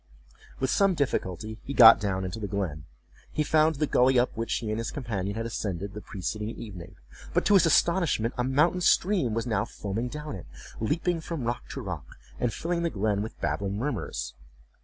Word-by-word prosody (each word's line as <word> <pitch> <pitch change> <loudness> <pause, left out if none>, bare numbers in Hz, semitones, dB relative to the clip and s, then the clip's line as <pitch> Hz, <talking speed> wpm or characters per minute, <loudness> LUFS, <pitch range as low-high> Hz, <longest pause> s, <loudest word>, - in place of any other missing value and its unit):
With 130 - 0
some 195 -2 +3
difficulty 110 - -2
he 140 - -5
got 115 -1 +10
down 95 -3 -1
into 95 +4 -5
the 105 - -3
glen: 90 -7 -3 0.5
he 150 - 0
found 155 +1 +3
the 150 +2 +1
gully 130 -2 +4
up 120 +1 +2
which 115 +1 -1
he 115 - -3
and 110 - -1
his 115 - -2
companion 100 -8 -3
had 115 0 -3
ascended 100 -3 -4
the 105 - -7
preceding 105 +3 -4
evening; 100 -7 -9 0.4
but - - +2
to 205 - +4
his 185 -4 +6
astonishment 165 -9 +2
a 125 - 0
mountain 150 +8 +2
stream 175 - +3
was 115 - -1
now 110 -5 +1
foaming 110 +1 -4
down 150 0 -6
it, 95 - -10 0.3
leaping 165 +8 0
from 160 -4 -4
rock 120 +1 -3
to - - -5
rock, - - -7 0.2
and 120 - +1
filling 170 +7 -2
the 170 - +1
glen 105 -3 0
with 110 - -6
babbling 100 0 -1
murmurs. 120 - -3
115 Hz, 195 wpm, -27 LUFS, 105-150 Hz, 0.5 s, got